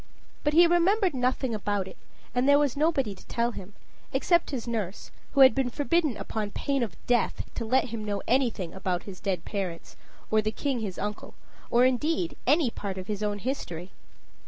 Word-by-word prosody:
But 295 - +1
he 340 +2 +8
remembered 350 +2 +3
nothing 255 -1 0
about 205 -2 -1
it, 190 - -10 0.4
and 250 +3 +2
there 285 - +7
was 290 -4 +1
nobody 285 -7 +1
to 190 - -16
tell 235 +1 0
him, 200 -2 -10 0.4
except 340 +6 +2
his 250 -5 -4
nurse, 210 -5 -3 0.2
who 275 - +4
had 260 -3 +9
been 265 0 0
forbidden 295 -1 +1
upon 215 -2 -3
pain 275 +5 -1
of 230 -5 -2
death 245 -1 +1
to 230 - -4
let 255 +2 +2
him 225 -1 -4
know 205 -2 -3
anything 235 -9 +1
about 185 -2 -2
his 190 -3 -9
dead 195 -3 -2
parents, 190 -5 -4 0.4
or 215 0 +4
the 215 - 0
king 270 +1 -2
his 200 -5 -4
uncle, 210 0 -5 0.3
or 240 +1 +5
indeed 310 +7 +1
any 290 -2 +4
part 195 -3 -5
of 185 - -5
his 210 0 -4
own 205 -1 -1
history. 190 - -4
235 Hz, 190 wpm, -28 LUFS, 205-275 Hz, 0.4 s, had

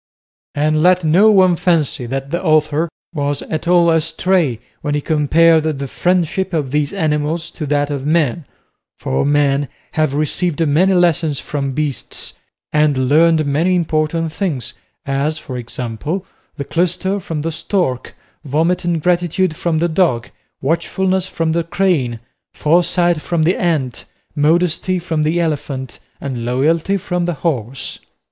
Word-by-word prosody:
And 155 +1 +1
let 180 +1 +4
no 180 +8 +5
one 190 -4 +5
fancy 160 -8 0
that 135 +2 -4
the 170 - -2
author 155 0 +2 0.2
was 145 -2 -2
at 160 +1 -4
all 175 -1 +5
astray 165 - +1 0.2
when 145 -1 -1
he - - +1
compared 160 +2 +3
the 140 -3 -2
friendship 180 +4 0
of 145 -5 -1
these 150 -1 0
animals 160 -2 -1
to 150 - -6
that 145 0 0
of 140 -2 -3
men; 155 -1 +1 0.5
for 65 - -1
men 145 -1 +2 0.2
have 155 -3 0
received 160 +2 0
many 180 +7 +3
lessons 170 -4 +2
from 140 -2 -3
beasts, 150 -1 -3 0.4
and 145 -4 +2
learned 160 +1 +4
many 160 +6 +1
important 160 -1 0
things, 160 -11 -3 0.3
as, 140 +3 -1
for 130 -4 -7
example, 125 - -4 0.3
the 140 - -4
clyster 185 +5 0
from 165 -4 -4
the 165 - -1
stork, 160 -6 -2 0.3
vomit 165 +6 0
and 170 -3 -1
gratitude 175 -1 +1
from 165 0 -1
the 170 +2 +2
dog, 155 -9 0 0.3
watchfulness 185 +5 0
from 165 -3 -1
the 170 +1 0
crane, 160 -10 0 0.4
foresight 175 +1 +2
from 170 -1 0
the 175 +4 +3
ant, 145 -9 -1 0.3
modesty 170 +4 +2
from 165 -3 -2
the 155 +3 +1
elephant, 145 -5 -3 0.2
and 130 -4 -4
loyalty 155 +10 +1
from 180 -1 -2
the 175 - -1
horse. 130 -4 -2
155 Hz, 145 wpm, -17 LUFS, 145-175 Hz, 0.5 s, no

